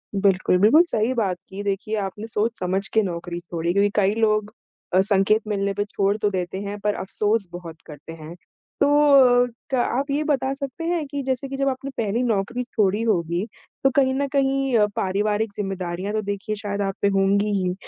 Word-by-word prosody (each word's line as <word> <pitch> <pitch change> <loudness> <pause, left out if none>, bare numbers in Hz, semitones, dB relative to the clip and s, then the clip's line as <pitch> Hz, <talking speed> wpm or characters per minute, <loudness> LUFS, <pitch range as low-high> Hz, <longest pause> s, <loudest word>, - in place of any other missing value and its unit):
बिल्कुल, 195 -2 +2
बिल्कुल 225 - +6
सही 245 -8 0
बात 200 -7 0
की 195 +1 -6
देखिए 205 +2 -2
आपने 210 +2 -4
सोच 225 +1 -1
समझ 190 +2 -1
के 220 - +4
नौकरी 175 -1 -4
छोड़ी 170 -1 -3
क्योंकि 200 +1 +3
कई 200 -1 +3
लोग 215 -1 +1 0.4
अ, 185 - +5
संकेत 205 +2 +3
मिलने 200 -1 -1
पे 205 +1 -1
छोड़ 200 -1 0
तो 210 -1 +1
देते 185 -1 -3
हैं 205 0 -5
पर 210 +1 0
अफ़सोस 210 +2 -1
बहुत 170 -2 -9
करते 150 +1 -10
हैं। 160 +1 -10 0.5
तो 285 - +5 0.9
क - - +4
आप 255 +3 0
ये 290 +2 0
बता 275 -3 0
सकते 275 +3 -6
हैं 335 -2 -1
कि 285 0 -4
जैसे 265 +1 -2
कि 270 - -5
जब 275 0 +1
आपने 270 +1 -5
पहली 225 +1 0
नौकरी 235 +1 -1
छोड़ी 210 -3 0
होगी, 175 -4 0 0.4
तो 270 - +5
कहीं 265 -2 +3
न 280 +1 0
कहीं 270 -2 +2
अ, 210 - +5
पारिवारिक 205 +3 0
ज़िम्मेदारियाँ 190 -1 -4
तो 215 - 0
देखिए 205 +1 -3
शायद 205 -1 -4
आप 195 -1 -1
पे - - +3
होंगी 200 +2 +2
ही 180 -1 0
205 Hz, 195 wpm, -23 LUFS, 190-235 Hz, 0.9 s, बिल्कुल